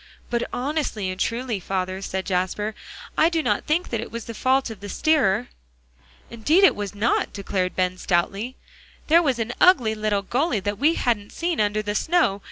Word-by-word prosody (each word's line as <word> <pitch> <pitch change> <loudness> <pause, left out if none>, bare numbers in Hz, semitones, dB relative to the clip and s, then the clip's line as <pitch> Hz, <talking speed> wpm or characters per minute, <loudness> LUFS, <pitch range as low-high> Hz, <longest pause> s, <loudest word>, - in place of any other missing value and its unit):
"But 240 0 -1
honestly 250 -8 -2
and 185 - -8
truly, 235 -1 -1
father," 185 0 -3
said 190 -1 -3
Jasper, 190 +3 -1 0.4
"I 320 - +4
do 330 -2 0
not - - 0
think 320 +4 +1
that 230 -2 -2
it - - -8
was 230 0 -6
the 230 - -6
fault 260 +2 +1
of 215 - -9
the 205 +1 -8
steerer." 245 -6 +2 0.8
"Indeed 300 - +3
it 390 - +6
was 205 0 -5
not," 210 +3 +1
declared 190 -2 -2
Ben 185 0 0
stoutly; 195 +8 -1 0.5
"there 335 +2 +7
was 275 -7 +1
an 230 +1 -2
ugly 250 -12 +5
little 215 -2 -1
gully 250 - 0
that 205 +1 -3
we 315 +3 +3
hadn't 210 -4 -1
seen 340 -6 -1
under 210 0 0
the 205 0 -2
snow. 265 - +2
220 Hz, 185 wpm, -23 LUFS, 200-265 Hz, 0.8 s, there